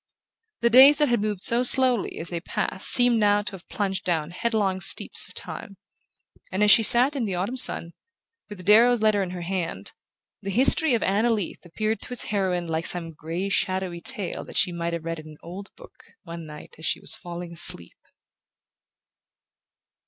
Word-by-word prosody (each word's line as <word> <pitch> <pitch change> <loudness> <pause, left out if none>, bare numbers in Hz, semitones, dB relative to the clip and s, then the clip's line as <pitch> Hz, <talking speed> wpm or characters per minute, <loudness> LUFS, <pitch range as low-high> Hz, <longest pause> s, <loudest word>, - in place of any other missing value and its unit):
The 235 0 +2
days 270 +4 +7
that 295 -2 +1
had 240 -3 0
moved 205 -2 -4
so 235 +1 +2
slowly 250 -2 +2
as 165 - -7
they 170 - -4
passed 190 +2 -2
seemed 245 -2 +3
now 205 -1 +2
to 210 - -7
have 190 -3 -13
plunged 195 -2 -3
down 165 -3 -3
head 230 +6 -3
long 190 -3 -1
steeps 185 - +2
of - - -19
time; 195 - -9 0.7
and 190 +3 -1
as 210 - +4
she - - +6
sat 245 +6 +6
in 255 -5 -2
the 195 -3 -4
autumn 195 +8 -4
sun, 170 -8 +3 0.6
with 190 -4 -11
Darrow's 230 +2 +4
letter 215 -2 +2
in 190 - -4
her 180 -1 -7
hand, 175 -2 -5 0.5
the 195 - -6
history 260 - +4
of 230 - -2
Anna 210 +5 0
Leath 210 -6 -4
appeared 215 +5 -3
to - - -7
its 245 - -4
heroine 185 -4 -2
like 165 0 -2
some 170 -2 0
grey 165 +5 -6
shadowy 190 -2 -3
tale 210 -7 -3
that - - -8
she 180 - +2
might 170 0 -5
have 165 -1 -6
read 165 -1 -5
in 155 - -13
an 155 -1 -14
old 190 +4 -10
book, 255 - -17 0.2
one 170 -2 -10
night 150 0 -12
as 160 - -9
she - - -2
was - - -2
falling 175 0 -8
asleep... 90 - -1
195 Hz, 195 wpm, -23 LUFS, 170-225 Hz, 0.7 s, days